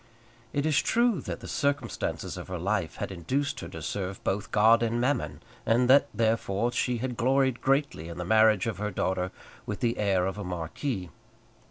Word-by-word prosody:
It 145 Hz, 0 st, -1 dB
is 155 Hz, -3 st, +3 dB
true 235 Hz, -4 st, +2 dB
that -, -, -6 dB
the -, -, -8 dB
circumstances 140 Hz, 0 st, -2 dB
of -, -, -7 dB
her 90 Hz, -, -4 dB
life 95 Hz, -2 st, -1 dB
had -, -, -4 dB
induced 135 Hz, -, -2 dB
her 85 Hz, -, -6 dB
to 80 Hz, -2 st, -8 dB
serve 95 Hz, +2 st, -4 dB
both 100 Hz, +3 st, -1 dB
God 110 Hz, +2 st, +5 dB
and 115 Hz, 0 st, 0 dB
Mammon, 130 Hz, +4 st, -1 dB, 0.2 s
and 120 Hz, +2 st, +3 dB
that, 140 Hz, -, +6 dB
therefore, 110 Hz, 0 st, 0 dB
she 125 Hz, 0 st, 0 dB
had 125 Hz, +1 st, -3 dB
gloried 130 Hz, +1 st, +2 dB
greatly 135 Hz, -, +1 dB
in 85 Hz, -, -7 dB
the 90 Hz, -, -4 dB
marriage 110 Hz, 0 st, +4 dB
of 110 Hz, -4 st, -3 dB
her 105 Hz, 0 st, -1 dB
daughter 95 Hz, -1 st, -1 dB, 0.4 s
with 105 Hz, -, -3 dB
the 120 Hz, -2 st, 0 dB
heir 95 Hz, -3 st, +2 dB
of 95 Hz, +2 st, -3 dB
a -, -, -4 dB
marquis. 90 Hz, -, -4 dB
110 Hz, 190 wpm, -28 LUFS, 95-130 Hz, 0.4 s, that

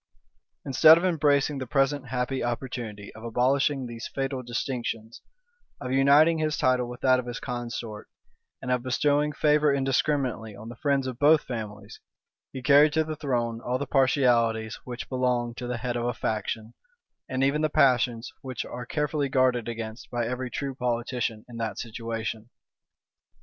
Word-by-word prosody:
Instead 155 Hz, +4 st, +7 dB
of 175 Hz, -, -1 dB
embracing 145 Hz, -4 st, +2 dB
the 130 Hz, -, -5 dB
present 135 Hz, +1 st, +1 dB
happy 125 Hz, +2 st, -2 dB
opportunity 120 Hz, -4 st, -5 dB
of 110 Hz, -, -12 dB
abolishing 130 Hz, +4 st, +1 dB
these 120 Hz, 0 st, -6 dB
fatal 135 Hz, -1 st, -3 dB
distinctions, 120 Hz, -2 st, -4 dB, 0.6 s
of 125 Hz, -2 st, -5 dB
uniting 145 Hz, +5 st, +5 dB
his 155 Hz, -1 st, 0 dB
title 125 Hz, -1 st, +2 dB
with 125 Hz, 0 st, -9 dB
that 130 Hz, -1 st, +4 dB
of 125 Hz, -, -5 dB
his 120 Hz, -, -5 dB
consort, 120 Hz, -3 st, -5 dB, 0.5 s
and 125 Hz, -, -2 dB
of 125 Hz, -1 st, +1 dB
bestowing 145 Hz, +4 st, +1 dB
favor 150 Hz, 0 st, +3 dB
indiscriminately 135 Hz, -5 st, 0 dB
on 110 Hz, +3 st, -9 dB
the 120 Hz, -, -8 dB
friends 140 Hz, +1 st, 0 dB
of 130 Hz, -2 st, -5 dB
both 150 Hz, +1 st, +5 dB
families, 110 Hz, -4 st, -7 dB, 0.5 s
he 130 Hz, -, -7 dB
carried 150 Hz, +2 st, +6 dB
to 160 Hz, 0 st, +3 dB
the 155 Hz, 0 st, -5 dB
throne 120 Hz, -6 st, -2 dB
all 125 Hz, +1 st, -1 dB
the 140 Hz, -, -3 dB
partialities 120 Hz, -5 st, +2 dB
which 125 Hz, -1 st, -6 dB
belong 125 Hz, -2 st, 0 dB
to 120 Hz, +1 st, -6 dB
the 125 Hz, 0 st, -2 dB
head 120 Hz, +1 st, -3 dB
of 120 Hz, 0 st, -1 dB
a 120 Hz, -1 st, -1 dB
faction, 110 Hz, +1 st, -3 dB, 0.6 s
and 130 Hz, 0 st, 0 dB
even 140 Hz, +3 st, +2 dB
the 155 Hz, -, +2 dB
passions 125 Hz, -4 st, +2 dB
which 130 Hz, -3 st, -5 dB
are 120 Hz, 0 st, -7 dB
carefully 150 Hz, -1 st, -1 dB
guarded 130 Hz, -3 st, +2 dB
against 115 Hz, 0 st, -6 dB
by 120 Hz, -1 st, -1 dB
every 125 Hz, +2 st, -3 dB
true 140 Hz, +1 st, -4 dB
politician 120 Hz, -2 st, -2 dB
in 120 Hz, -1 st, -10 dB
that 110 Hz, -3 st, -3 dB
situation. 115 Hz, -1 st, -5 dB
125 Hz, 165 wpm, -26 LUFS, 120-140 Hz, 0.6 s, Instead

